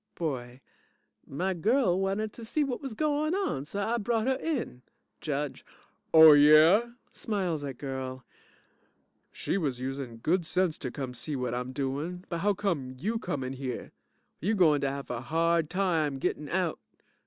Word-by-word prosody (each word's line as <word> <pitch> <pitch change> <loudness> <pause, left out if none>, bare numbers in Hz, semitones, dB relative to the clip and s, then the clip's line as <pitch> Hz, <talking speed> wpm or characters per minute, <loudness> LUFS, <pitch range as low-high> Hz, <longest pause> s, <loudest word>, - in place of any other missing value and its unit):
BOY 130 -6 -4 0.7
My 185 +7 -1
girl 190 - +2
wanted 195 +3 -1
to 235 - -10
see 295 +7 0
whut 270 -1 -3
was 270 -6 -6
goin' 305 +3 0
on, 265 - -1
so 200 +6 -4
I 230 +4 0
brought 225 +1 0
her 265 - +3
in. 265 - -3 0.4
JUDGE 145 -2 -3 0.5
Oh 160 -1 +10
yeah! 155 +11 +6 0.2
(Smiles 185 -9 -2
at 135 -3 -5
GIRL) 130 -2 -5 1.1
She 195 - -2
was 135 -7 -2
usin' 130 -2 -5
good 170 +10 +1
sense 180 0 0
to 130 - -3
come 130 0 -5
see 150 +5 -4
whut 125 -2 -2
I'm 125 +1 -3
doin', 145 +7 -3
but 170 - -2
how 205 +3 +2
come 160 -11 -2
you 220 - -2
come 145 -10 -3
in 130 +1 -4
here? 130 -1 -5 0.5
You 205 +8 0
gointer 150 -7 +3
have 140 -1 -5
a 120 -1 -3
hard 165 +3 +1
time 165 -7 0
gittin' 150 +2 -2
out. 180 -3 -1
160 Hz, 165 wpm, -29 LUFS, 135-200 Hz, 1.1 s, Oh